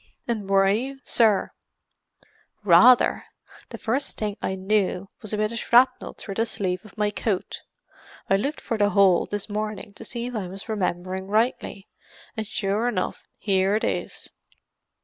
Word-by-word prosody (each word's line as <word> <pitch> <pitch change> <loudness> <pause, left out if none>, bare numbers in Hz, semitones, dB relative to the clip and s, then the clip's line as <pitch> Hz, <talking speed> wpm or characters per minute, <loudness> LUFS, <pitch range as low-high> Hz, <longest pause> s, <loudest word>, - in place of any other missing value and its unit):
"And 215 -5 -3
were 195 0 +4
you, 255 +7 -1
sir?" 220 -4 +2 1.1
"Rather. 205 +7 +6 0.4
The - - -7
first 265 +5 -2
thing 210 -2 -2
I 190 - -2
knew 190 -1 -1
was 215 - -5
a 210 - -1
bit 215 +1 0
of 230 - -4
shrapnel 250 +3 +3
through 200 - -6
the 225 +3 0
sleeve 185 -4 -2
of 215 0 -16
my 210 -1 +1
coat; 205 -3 -3 0.7
I 195 - +3
looked 275 +10 -2
for 230 - -3
the 205 0 +4
hole 195 -2 +4
this 205 -1 -3
morning, 210 -1 -4
to - - -11
see 235 -1 -5
if 250 - -5
I 210 -5 -3
was 195 +2 -8
remembering 190 -3 -2
rightly, 215 -2 -1 0.5
and 220 -2 -4
sure 210 +2 -1
enough, 185 -7 -3
here 195 0 +1
it 220 - -1
is." - - -3
210 Hz, 165 wpm, -24 LUFS, 195-225 Hz, 1.1 s, Rather